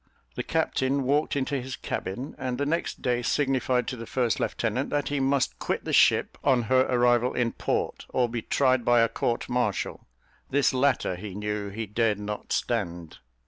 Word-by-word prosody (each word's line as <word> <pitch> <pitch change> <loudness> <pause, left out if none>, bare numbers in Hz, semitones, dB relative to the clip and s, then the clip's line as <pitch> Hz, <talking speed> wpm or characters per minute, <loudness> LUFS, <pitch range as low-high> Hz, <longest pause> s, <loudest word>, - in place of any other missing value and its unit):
The - - -3
captain 135 +1 0
walked 145 +4 +1
into 140 0 -1
his 130 +1 -5
cabin, 120 +10 -4
and 130 -2 -2
the 145 - 0
next 165 +4 -2
day 125 -1 +1
signified 130 -2 +1
to - - -4
the 115 -2 -8
first 120 -3 0
lieutenant, 120 +4 -1
that 145 -1 -1
he 145 -1 -1
must 135 -1 +1
quit - - -2
the - - -3
ship - - +4
on 130 -4 +3
her 130 +2 +3
arrival 120 0 +3
in 120 -2 +1
port, - - -2
or 125 -1 +1
be 115 0 -4
tried 130 +1 +2
by 120 0 +4
a 115 - +4
court 115 +1 -2
martial: 125 -6 -2 0.4
this 140 -1 +2
latter 130 -7 +1
he 95 0 -7
knew 105 0 -3
he 110 +3 -4
dared 110 0 +1
not 105 0 -6
stand. 85 -2 -2
125 Hz, 185 wpm, -27 LUFS, 115-135 Hz, 0.4 s, ship